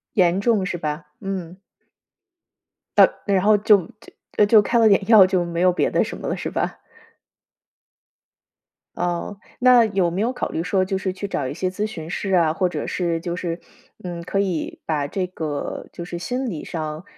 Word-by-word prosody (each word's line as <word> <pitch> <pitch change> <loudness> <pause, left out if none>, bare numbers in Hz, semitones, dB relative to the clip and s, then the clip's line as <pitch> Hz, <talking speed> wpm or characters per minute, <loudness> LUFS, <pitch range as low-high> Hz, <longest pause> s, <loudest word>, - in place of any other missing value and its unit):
严 180 -2 +3
重 215 -2 +2
是 180 - -2
吧？ 150 -1 -4
嗯。 185 -3 -5 1.4
呃， - - +9 0.2
然 195 -3 +2
后 210 +1 +5
就 205 -3 +4 0.5
就 - - +6
就 210 0 +6
开 235 - +1
了 225 -1 +6
点 200 -1 +3
药， 215 -5 +8
就 185 -1 0
没 170 0 -3
有 180 0 +4
别 175 - 0
的 - - +2
什 - - -6
么 - - -5
了， - - -1
是 - - -4
吧？ - - -3 2.1
哦， 175 +3 -3 0.2
那 250 -1 +6
有 190 -4 +1
没 180 +3 -3
有 235 +4 +1
考 255 - -3
虑 165 - -2
说 185 +1 +1
就 190 0 -2
是 190 -1 -2
去 195 +2 -5
找 145 -9 -3
一 - - -5
些 185 +3 -2
咨 205 +3 -2
询 165 -6 -8
师 195 +1 -3
啊， 170 -4 +4
或 180 +2 0
者 - - -4
是 170 -2 -1
就 170 0 -4
是， 170 -2 -3 0.5
嗯， 175 -1 -5
可 190 +3 -2
以 185 -5 -2
把 150 -3 -1
这 185 +5 -2
个， 155 -5 -5
就 170 - -7
是 175 0 -6
心 250 +7 -3
理 160 -6 -5
上 155 0 -5
185 Hz, 205 characters per minute, -22 LUFS, 170-200 Hz, 2.1 s, 呃